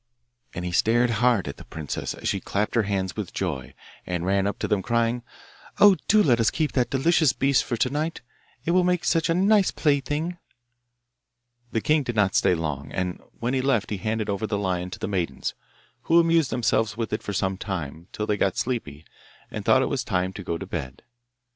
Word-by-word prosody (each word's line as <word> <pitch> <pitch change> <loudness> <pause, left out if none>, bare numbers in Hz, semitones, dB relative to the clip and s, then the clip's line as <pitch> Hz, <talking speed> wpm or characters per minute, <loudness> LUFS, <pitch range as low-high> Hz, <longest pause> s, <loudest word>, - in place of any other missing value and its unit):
And 90 0 -4
he 90 - -2
stared 120 +6 +3
hard 120 -8 +3
at 70 - -6
the - - -11
princess 80 -3 -5
as - - -5
she - - 0
clapped 105 +3 -2
her 115 - +3
hands 95 -2 -1
with - - -5
joy 65 -2 -3 0.3
and 90 -1 -3
ran 100 +1 +2
up 100 - -2
to - - -2
them, 105 -2 +1
crying, 115 +3 0 0.3
' - - -22
Oh, 205 -2 +8
do 215 0 +5
let 120 -5 +3
us 115 - +4
keep 155 -2 -1
that 125 -2 +1
delicious 155 +1 +3
beast 140 0 +2
for 120 - -3
to 125 - +2
night; 155 +3 -2 0.4
it 170 - +1
will 180 +1 +4
make 180 -1 +1
such 165 -2 +2
a 165 - +3
nice 200 +1 +4
plaything.' 150 +4 0 1.3
The 115 - 0
king 155 +5 +3
did 120 -4 -4
not 100 -2 +2
stay 90 - +3
long, 75 -3 -4
and 90 -1 -3 0.2
when 120 +2 -1
he 130 - +1
left 115 -6 +1
he 105 - -1
handed 110 +2 -2
over 100 +1 -2
the 105 - -1
lion 90 -2 -1
to - - -7
the - - -4
maidens, 85 -9 -2 0.5
who 165 +1 +5
amused 165 -3 +3
themselves 110 -2 0
with 115 -2 -3
it 105 - -1
for - - -5
some 95 0 0
time, 85 -4 -5
till 105 - -3
they 105 -1 0
got 95 -2 +1
sleepy, 80 - -3 0.5
and - - -5
thought - - +4
it - - -1
was - - -1
time 95 0 -1
to 100 - -7
go 85 -1 -2
to 95 - -7
bed. 75 -9 -6
110 Hz, 215 wpm, -25 LUFS, 95-140 Hz, 1.3 s, Oh